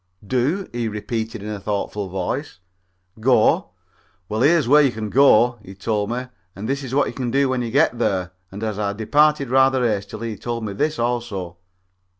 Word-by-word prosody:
"Do?" 135 - 0
he 120 -1 -2
repeated, 110 0 -4
in 105 - -5
a 105 -1 -4
thoughtful 100 0 -3
voice. 95 - -3 0.6
"Go? 115 -5 +3 0.6
Well, 110 +1 -2
here's 150 0 +4
where 150 +4 +7
you 140 -3 +3
can 110 -2 -5
go," 125 -3 +5
and 105 - -21
he 95 - -10
told 105 +1 -1
me, 125 +2 -3 0.3
"and 100 +3 -6
this 135 +2 -1
is 130 0 -4
what 145 - +4
you - - -5
can 125 -3 -3
do 135 +2 +2
when 130 -1 0
you 120 - -3
get 120 -1 +2
there," 90 -2 0 0.2
and 100 +3 -7
as 105 -2 -3
I 100 -1 -1
departed 140 +5 +2
rather 130 -1 +4
hastily 110 +2 -3
he 105 - -7
told 115 0 -4
me 100 - -4
this 150 +8 -1
also. 115 -8 -3
115 Hz, 195 wpm, -21 LUFS, 105-130 Hz, 0.6 s, where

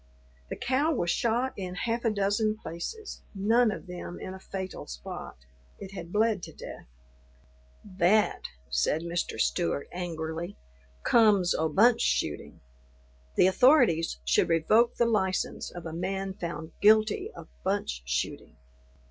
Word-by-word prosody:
The - - -3
cow 275 +5 +1
was 175 - 0
shot 240 +3 0
in 185 -2 -5
half 230 +5 -2
a 230 - +3
dozen 215 +1 +1
places, 220 - -7
none 225 +4 +3
of 210 - -5
them 180 -1 -7
in 185 - -6
a 190 - -9
fatal 190 0 -6
spot; 60 +1 -8 0.4
it 195 -1 -9
had 170 -3 -7
bled 215 -1 +2
to - - -8
death. - - -10 1.1
"That," 205 +5 +3 0.3
said 65 - +1
Mr. 170 0 -3
Stewart 80 - 0
angrily, 170 0 -4 0.5
"comes 210 -6 +5
o' 160 0 0
bunch 225 +9 +4
shooting. - - -1 0.7
The - - +5
authorities 190 - +4
should 65 - +3
revoke 215 +9 +3
the 235 - +3
license 190 -5 0
of 175 -1 -9
a 160 - -5
man 190 +3 -3
found 165 -4 -6
guilty 215 0 +4
of - - -10 0.2
bunch - - -1
shooting." 65 0 -3
190 Hz, 140 wpm, -28 LUFS, 170-220 Hz, 1.1 s, comes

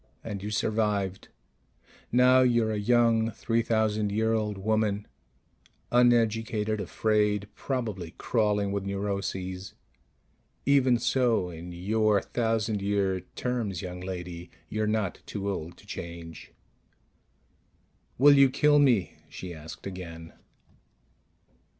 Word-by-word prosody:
And 105 -4 -5
you 105 - -4
survived. 105 -3 -1 0.8
Now 125 +1 +6
you're 120 -3 +3
a 105 - -1
young 115 0 +3
three 115 +1 -1
thousand 110 -2 0
year 110 +2 +1
old 105 -2 -1
woman... 105 0 0 0.9
uneducated, 115 -3 +2
afraid, 105 +1 +1
probably 110 -12 -4
crawling 105 -3 +1
with 100 -1 -2
neuroses. 100 -1 -4 0.9
Even 130 -3 +4
so, 115 -6 +1
in 85 +1 -8
your 105 +4 +2
thousand 110 -3 -1
year 100 -2 0 0.2
terms, 115 -8 -2
young 90 -1 -6
lady, 90 -2 -6 0.2
you're 110 0 -1
not 105 -3 -1
too 100 -1 -4
old 85 -3 -6
to - - -18
change._ 85 -1 -8 1.7
"Will 145 +3 +7
you 140 -1 +6
kill 145 +2 +4
me?" 120 -10 +2
she 90 -1 -7
asked 80 0 -10
again. 85 -4 -8
105 Hz, 110 wpm, -28 LUFS, 95-115 Hz, 1.7 s, Will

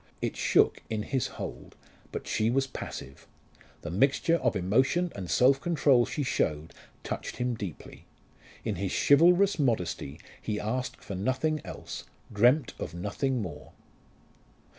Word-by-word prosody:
It - - -2
shook - - +3
in 110 -1 -2
his 130 +2 -1
hold, - - -7 0.4
but - - -5
she 110 +1 +1
was 135 +3 +2
passive. 70 - -8 0.6
The 85 - -4
mixture 135 - +3
of 125 -7 0
emotion 130 - +2
and 95 -3 -6
self 130 +10 +4
control 145 -7 +3
she 145 - -2
showed 80 - -1 0.3
touched - - -4
him 125 0 0
deeply. 100 -8 -8 0.6
In 105 -5 -1
his 95 +1 -2
chivalrous 175 +6 +5
modesty 90 - -1 0.2
he 105 -1 -2
asked 125 +4 -3
for 100 - -6
nothing 130 +10 0
else, - - -7 0.3
dreamt 125 +6 +4
of 80 - -5
nothing 115 +7 -1
more. 80 -6 -8
120 Hz, 140 wpm, -29 LUFS, 100-135 Hz, 0.6 s, chivalrous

